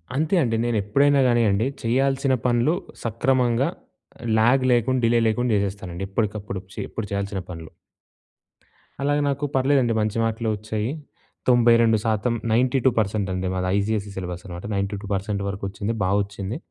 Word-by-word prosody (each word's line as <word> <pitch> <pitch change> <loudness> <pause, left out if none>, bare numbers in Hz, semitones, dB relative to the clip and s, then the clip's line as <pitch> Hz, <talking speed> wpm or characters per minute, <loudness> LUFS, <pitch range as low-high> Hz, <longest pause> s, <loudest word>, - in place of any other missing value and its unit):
అంతే 155 +6 +1
అండి. 115 -3 0
నేను 120 -2 0
ఎప్పుడైనా 140 +7 +3
గానియండి 115 -2 +2 0.2
చేయాల్సిన 135 +3 +1
పనులు 125 +6 +2 0.3
సక్రమంగా, 120 +2 +1 0.7
ల్యాగ్ 120 +4 +4
లేకుండా 120 +1 +1
డిలే 120 +1 +3
లేకుండా 120 +2 0
చేసేస్తానండి. 95 -2 -3
ఎప్పటికప్పుడు 105 -2 -2
చే - - -26
ఎప్పుడు 110 - -4
చేయాల్సిన 100 -1 -2
పనులు 80 -2 -8 1.3
అలాగ 145 +1 +1
నాకు 140 +1 -1
పర్లేదండి 130 -3 +3
మంచి 110 +1 -1
మార్కులే 115 0 -1
వచ్చాయి. 105 +1 -3 0.6
92% 115 -2 +3 0.2
92% 115 -4 +1
అండి 95 0 -2
మాది. 90 0 -1
ఐసీఎస్ఈ 105 0 -1
సిలబస్ 90 -2 -5
అనమాట. 90 0 -8
92% 100 0 -2
వరకు 100 0 -6
వచ్చింది 100 +3 -3
బా 95 - +1
వచ్చింది. 100 +2 -5
110 Hz, 130 wpm, -23 LUFS, 100-125 Hz, 1.3 s, ల్యాగ్